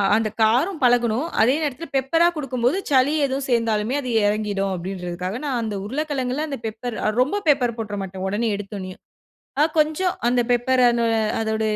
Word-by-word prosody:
அந்த 220 -1 +1
காரம் 265 - +2
பழகனும். 245 +3 +2
அதே 250 +5 +4
நேரத்ல, 300 +3 -3
பெப்பரா 325 +6 +3
குடுக்கும் 265 -5 -4
போது 300 +10 +3
சளி 265 +2 +4
எதுவும் 270 0 -2
சேந்தாலுமே 230 0 +1
அது 255 - -5 0.2
எறங்கிடும் 205 -2 -1
அப்டின்றதுக்காக 180 +2 -5
நான் 260 -4 -1
அந்த 215 -2 -3
உருளக்கிழங்குல 275 +2 -2
அந்த 280 -2 -4
பெப்பர் 220 +1 -5
அ - - +4
ரொம்ப 400 +11 0
பெப்பர் 245 -5 +2
போட்ற 210 -2 -4
மாட்டேன். 190 0 -6
ஒடனே 220 +4 0
எடுத்தோன்னயே. 195 -2 -7 0.6
ஆ, - - +6 0.2
கொஞ்சம் 315 +4 +1
அந்த 245 0 +3
பெப்பர 255 +2 +2
அன்ன 235 -1 +1 0.3
அதோட 220 0 -1
240 Hz, 165 wpm, -22 LUFS, 215-275 Hz, 0.6 s, ஆ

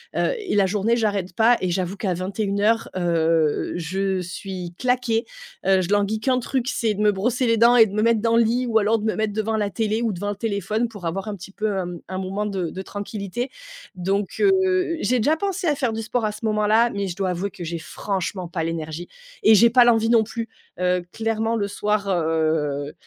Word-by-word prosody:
heu - - +1
et 405 - -3
la 200 -2 +4
journée, 210 +4 +1
j'arrête 200 -5 -1
pas 235 +2 +5
et 180 -1 -1
j'avoue 185 +2 -2
qu'à 190 -3 -1
21:00, 200 +4 0
heu, 165 -3 +1
je 185 +3 -1
suis 180 0 -6
claquée, 245 -2 0 0.4
heu, 190 -1 +4
je 180 - -3
languis 205 +1 +1
qu'un 255 0 +2
truc, 255 +1 -2
c'est 225 -6 0
de 205 - -4
me 210 -1 +5
brosser 240 +6 0
les 230 0 +3
dents 235 +2 +6
et 225 -2 +8
de 200 - -7
me 215 - 0
mettre 230 -1 +3
dans 230 - +1
le 235 - +6
lit 245 +3 0
ou 225 -1 +2
alors 220 +1 +2
de 215 - -5
me 220 - 0
mettre 215 -1 -1
devant 220 +1 -1
la 205 -2 -1
télé 220 +1 -1
ou 220 -3 0
devant 205 +3 -3
le 205 - -2
téléphone 215 +2 -1
pour 205 -6 -10
avoir 195 +5 -3
un 210 - -3
petit 195 +1 -11
peu, 210 0 -2
hem, 175 -2 -4
un 185 - -5
moment 195 +3 -3
de 190 -5 -2
de 190 - -6
tranquillité. 205 +4 -5 0.5
Donc, 195 +2 -1
heu, 375 -3 +2
j'ai 255 - +2
déjà 300 +8 +3
pensé 385 0 -3
à 295 - +4
faire 255 -5 -1
du 225 - -3
sport 230 +1 -1
à 210 - 0
ce 215 +2 -7
moment-là, 215 +2 +3
mais 200 -1 -2
je 175 - -5
dois 190 -2 -1
avouer 180 +3 -2
que 180 -2 -9
j'ai 170 0 -4
franchement 185 0 -4
pas 165 -1 -3
l'énergie 165 +1 -4 0.4
et 220 - +7
j'ai 235 +4 +6
pas 245 -1 +7
l'envie 225 -1 +3
non 230 -2 +5
plus, 230 +1 -5 0.3
heu, 180 0 +1
clairement, 225 0 -1
le 200 -2 -1
soir, 205 0 -1
heu, 155 -4 0
205 Hz, 225 wpm, -23 LUFS, 185-230 Hz, 0.5 s, et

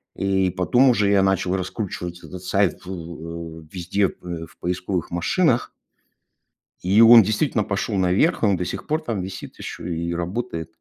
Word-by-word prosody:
И 95 -1 +1
потом 120 +9 +3
уже 105 -4 +3
я 100 -1 +4
начал 95 -1 +1
раскручивать 90 -2 -5
этот 90 0 -9
сайт, 95 -1 +1
ф - - -20
в 85 -2 -7
э, - - -19
везде 95 +2 0
в 85 -2 -8
поисковых 90 0 -3
машинах 120 - +1 1.1
и 95 +4 +4
он 115 0 +10
действительно 110 +2 0
пошёл 100 +1 -2
наверх. 95 - +2
Он 100 -4 +3
до 90 - -2
сих - - -5
пор 155 +1 -1
там 110 -6 -2
висит 95 +1 -8
ещё - - -7
и 85 0 -3
работает. 85 -2 -4
95 Hz, 160 wpm, -23 LUFS, 85-105 Hz, 1.1 s, он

